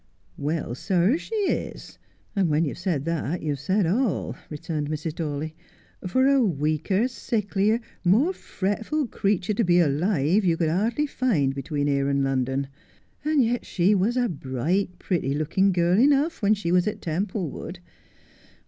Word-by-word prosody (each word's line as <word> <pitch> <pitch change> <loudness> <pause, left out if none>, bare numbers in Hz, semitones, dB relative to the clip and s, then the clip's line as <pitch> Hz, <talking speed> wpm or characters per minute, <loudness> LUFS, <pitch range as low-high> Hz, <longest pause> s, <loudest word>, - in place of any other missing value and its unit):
' - - -36
Well, 155 -7 -2
sir, 185 - +2
she 450 - -6
is, 410 -3 -2 0.4
and 190 -4 +2
when 155 +2 +2
you've 145 - -5
said 170 -6 -1
that 165 0 -2
you've 145 -3 -2
said 190 +7 +1
all,' 215 +5 0
returned 150 -1 -4
Mrs. 155 +1 -3
Dawley, 155 -1 -4 0.3
' - - -11
for 260 +8 +2
a 275 -1 +4
weaker, 165 - +1
sicklier, 215 -3 0 0.2
more 230 - +3
fretful 220 - -2
creature 200 -3 0
to 230 - +1
be 175 -2 +4
alive 170 +4 +2
you 170 -3 +2
could 165 -2 +1
hardly 225 - +1
find 205 - +1
between 145 +1 -2
here 140 -1 +1
and 140 0 +1
London. 135 0 0 0.6
And 300 -2 +3
yet 240 +1 0
she 185 +3 +2
was 210 +6 +1
a 245 -1 +2
bright, 170 - -2
pretty 160 -8 -1
looking 165 +6 +2
girl 175 +2 +2
enough 285 +5 +3
when 210 +1 +4
she 195 -5 -3
was 180 +1 +3
at 210 0 -2
Templewood. 180 0 -3
180 Hz, 160 wpm, -25 LUFS, 150-215 Hz, 0.6 s, a